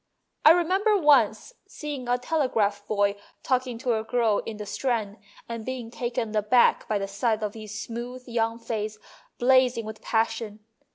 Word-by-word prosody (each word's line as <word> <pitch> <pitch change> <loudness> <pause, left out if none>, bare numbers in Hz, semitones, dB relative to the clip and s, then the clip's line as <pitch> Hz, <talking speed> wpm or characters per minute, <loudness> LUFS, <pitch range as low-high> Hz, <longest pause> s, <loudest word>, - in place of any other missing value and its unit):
I - - +9
remember 375 +6 +4
once 300 - +3
seeing 290 -5 -6
a 245 - +3
telegraph 230 -8 0
boy 205 -1 +1 0.3
talking 255 -2 0
to 230 -2 0
a - - -5
girl 225 -2 +1
in 220 - -5
the 210 - -6
Strand, 215 -1 -2 0.3
and 230 -1 -5
being 250 -2 -5
taken 235 -2 -3
aback 215 +4 +3
by 215 - +1
the 195 0 -3
sight 215 +2 -1
of 210 -1 -2
his 215 -1 -7
smooth 240 +3 -6
young 230 -1 0
face 215 -2 -4 0.4
blazing 250 -2 +3
with 220 0 -8
passion. 225 -2 -1
230 Hz, 160 wpm, -26 LUFS, 215-255 Hz, 0.4 s, I